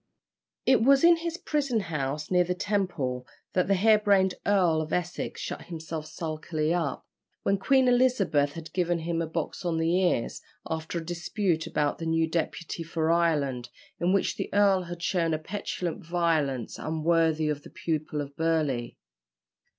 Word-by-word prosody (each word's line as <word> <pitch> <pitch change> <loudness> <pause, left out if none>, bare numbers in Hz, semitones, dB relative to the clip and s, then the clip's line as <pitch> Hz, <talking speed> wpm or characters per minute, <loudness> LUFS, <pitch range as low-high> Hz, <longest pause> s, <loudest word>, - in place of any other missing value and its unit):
It 260 -2 +5
was 275 +4 +5
in 340 0 +7
his 335 0 -4
prison 280 -10 0
house 150 -3 -3
near 180 -1 +5
the 180 +1 -2
Temple 175 -11 -2 0.3
that 180 -1 +2
the 195 - +3
hair 215 +3 +5
brained 195 -3 +3
Earl 180 -6 +3
of 155 0 -6
Essex 175 0 -2
shut - - -5
himself 160 -2 -6
sulkily 155 0 -2
up, 165 -6 -2 0.4
when 195 0 +1
Queen 265 +4 +3
Elizabeth 220 - +3
had 165 -1 -9
given 175 -2 +1
him 165 0 -1
a 165 - -2
box 160 +2 -4
on 170 -2 0
the 165 +2 +1
ears, 175 -10 0 0.3
after 160 +1 -3
a 165 - -4
dispute 175 0 -1
about 150 -3 0
the 165 - -3
new 165 0 +2
deputy 165 +1 -3
for 165 0 0
Ireland, 145 -8 +1 0.3
in 175 +1 +2
which 195 0 +1
the - - -3
earl 200 -2 +4
had 170 0 -7
shown 165 -3 +1
a - - -1
petulant 180 0 -4
violence 160 -7 0
unworthy 160 0 +1
of 150 -1 -1
the - - -13
pupil 155 -2 -3
of 140 0 -8
Burleigh. 155 -7 0
165 Hz, 165 wpm, -27 LUFS, 155-190 Hz, 0.4 s, in